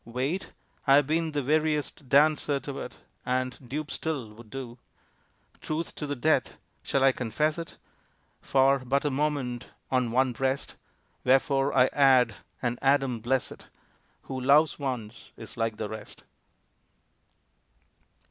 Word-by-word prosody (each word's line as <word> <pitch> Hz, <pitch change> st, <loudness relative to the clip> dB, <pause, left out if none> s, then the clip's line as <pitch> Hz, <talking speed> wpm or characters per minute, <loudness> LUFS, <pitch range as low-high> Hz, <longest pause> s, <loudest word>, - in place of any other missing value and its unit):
Wait? 130 Hz, -, -3 dB, 0.4 s
I 135 Hz, -, +7 dB
have 145 Hz, 0 st, +5 dB
been 160 Hz, +2 st, 0 dB
the 145 Hz, -2 st, -1 dB
veriest 150 Hz, -1 st, 0 dB
dancer 145 Hz, 0 st, +4 dB
To 140 Hz, -2 st, -6 dB
it, -, -, -7 dB, 0.3 s
and, 130 Hz, -1 st, -1 dB
dupe 150 Hz, +3 st, -4 dB
still, 135 Hz, -9 st, -3 dB
would 110 Hz, 0 st, -14 dB
do 125 Hz, -2 st, -7 dB, 0.8 s
Truth 160 Hz, +2 st, -3 dB
to 150 Hz, -, -5 dB
the 145 Hz, -, -2 dB
death 140 Hz, 0 st, +1 dB, 0.2 s
shall 135 Hz, -, 0 dB
I 135 Hz, -, +6 dB
confess 150 Hz, +7 st, -1 dB
it? 165 Hz, -, -8 dB, 0.6 s
For 135 Hz, 0 st, +3 dB
but 135 Hz, +3 st, 0 dB
a 145 Hz, -, +1 dB
moment 135 Hz, -4 st, -1 dB, 0.2 s
on 125 Hz, -2 st, +2 dB
one 130 Hz, +2 st, +2 dB
breast. 135 Hz, +2 st, -2 dB, 0.5 s
Wherefore 135 Hz, +2 st, +3 dB
I 125 Hz, -, +7 dB
add 130 Hz, -5 st, +5 dB, 0.3 s
and 120 Hz, 0 st, -1 dB
Adam 135 Hz, -3 st, +2 dB
bless 125 Hz, +3 st, 0 dB
it! -, -, -12 dB, 0.5 s
Who 130 Hz, -1 st, -5 dB
loves 145 Hz, +5 st, +4 dB
once 125 Hz, -5 st, -5 dB
is 115 Hz, -, -8 dB
like 115 Hz, -1 st, -1 dB
the 110 Hz, -, -3 dB
rest. 110 Hz, +1 st, -9 dB
135 Hz, 140 wpm, -28 LUFS, 125-145 Hz, 0.8 s, I